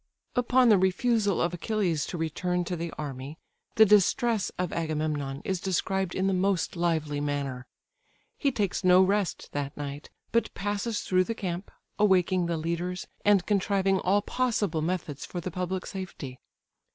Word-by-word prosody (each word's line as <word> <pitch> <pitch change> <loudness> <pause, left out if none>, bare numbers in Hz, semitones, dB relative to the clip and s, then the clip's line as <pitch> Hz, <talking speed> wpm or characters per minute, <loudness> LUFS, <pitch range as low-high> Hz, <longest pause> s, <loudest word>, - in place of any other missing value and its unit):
Upon 250 0 +4
the 210 -3 +6
refusal 200 +2 +2
of 170 +1 +1
Achilles 175 -5 -1
to 175 - -4
return 175 +3 -1
to 180 - -2
the 170 0 -4
army, 140 0 -6 0.4
the 220 - +8
distress 210 +1 +3
of 180 -1 -2
Agamemnon 150 -4 -2
is 190 -2 -1
described 190 0 -1
in 190 - 0
the 195 - +2
most 185 -1 +1
lively 160 -4 0
manner. 140 -3 -3 0.7
He 280 - +1
takes 200 -5 -1
no 185 +1 +7
rest 200 0 0
that 145 0 -4
night, 145 0 -6 0.2
but 230 - +1
passes 205 +2 -2
through 185 0 +2
the 230 - -3
camp, 180 -1 -4 0.3
awaking 185 -3 +3
the 170 -1 -1
leaders, 170 +3 -3 0.2
and 205 -3 +4
contriving 195 -1 +2
all 200 +3 +2
possible 215 -11 0
methods 160 -4 -3
for 175 - -5
the 180 +1 -5
public 180 +2 -3
safety. 160 -9 -7
180 Hz, 155 wpm, -28 LUFS, 160-200 Hz, 0.7 s, the